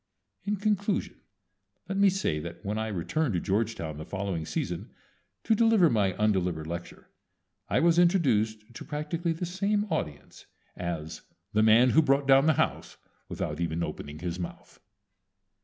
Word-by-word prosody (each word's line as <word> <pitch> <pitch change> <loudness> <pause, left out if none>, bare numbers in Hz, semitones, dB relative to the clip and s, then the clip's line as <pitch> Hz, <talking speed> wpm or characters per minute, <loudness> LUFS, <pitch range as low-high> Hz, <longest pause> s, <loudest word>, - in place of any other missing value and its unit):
In 205 +1 0
conclusion 205 -1 -1 0.7
let 190 - -3
me 200 0 +5
say 185 - -1
that 85 +5 -8
when 105 +2 -2
I 110 - -2
returned 110 - -1
to - - +1
Georgetown 100 -6 -2
the - - -5
following 95 -3 -4
season - - -3 0.5
to - - +2
deliver 220 -6 +4
my 100 -5 +2
undelivered 90 -6 0
lecture 85 +2 -8 0.6
I - - +2
was 170 0 +4
introduced 120 - +2
to - - -8
practically 160 +3 -2
the 165 +2 -4
same 200 +4 0
audience 75 - -5 0.3
as 85 -3 -5 0.3
"the 105 - +3
man 115 +3 +6
who 160 - +6
brought 140 -1 +2
down 135 +2 +6
the 160 - +5
house - - -1 0.3
without 75 +1 -4
even 85 0 -1
opening 75 -2 -6
his 90 +1 -4
mouth." 85 - -8
110 Hz, 155 wpm, -28 LUFS, -, 0.7 s, man